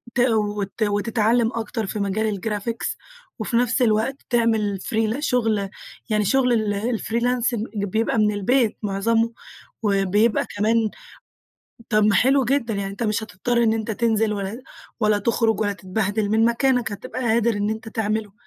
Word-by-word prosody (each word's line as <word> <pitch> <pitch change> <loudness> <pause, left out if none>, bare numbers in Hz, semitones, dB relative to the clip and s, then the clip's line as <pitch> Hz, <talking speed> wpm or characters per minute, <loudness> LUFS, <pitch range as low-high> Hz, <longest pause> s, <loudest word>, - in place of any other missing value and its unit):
ت - - 0
وت 210 -3 0
وتتعلَّم 225 +2 +1
أكتر 225 -1 -3
في 210 - -4
مجال 200 0 -1
الgraphics، 220 +2 -3 0.4
وفي 235 - -1
نفس 250 +2 +1
الوقت 225 +3 +2
تعمل 220 -4 +1
free - - -6
لشغل، 225 -3 0 0.4
يعني 210 -1 +1
شغل 235 -2 +2 0.3
الfreelance 240 +1 0 0.3
بيبقى 220 +4 0
من 210 -1 +3
البيت 220 +3 +1
معظمه، 225 +3 +1 0.5
وبيبقى 205 +2 +2
كمان 215 +3 +2 1.1
طب 215 -2 +3
ما 210 -1 +4
حلو 265 +3 +4
جدًا، 240 -3 0
يعني 195 -1 -3
أنتَ 205 +4 -6
مش 215 0 0
هتضطر 230 +4 -1
إن 225 -1 +3
أنتَ 225 0 -2
تنزِل 220 -1 +1
ولا 200 +3 -4 0.4
ولا 210 -1 +3
تخرج 225 0 +1
ولا 205 -1 +1
تتبهدِل 200 +2 -2
من 220 +1 +3
مكانك. 240 -1 +1
هتبقى 205 +5 -6
قادر 235 -1 +2
إن 205 +1 -1
أنتَ 220 0 -5
تعمله. 215 -1 -2
220 Hz, 145 wpm, -23 LUFS, 205-235 Hz, 1.1 s, ما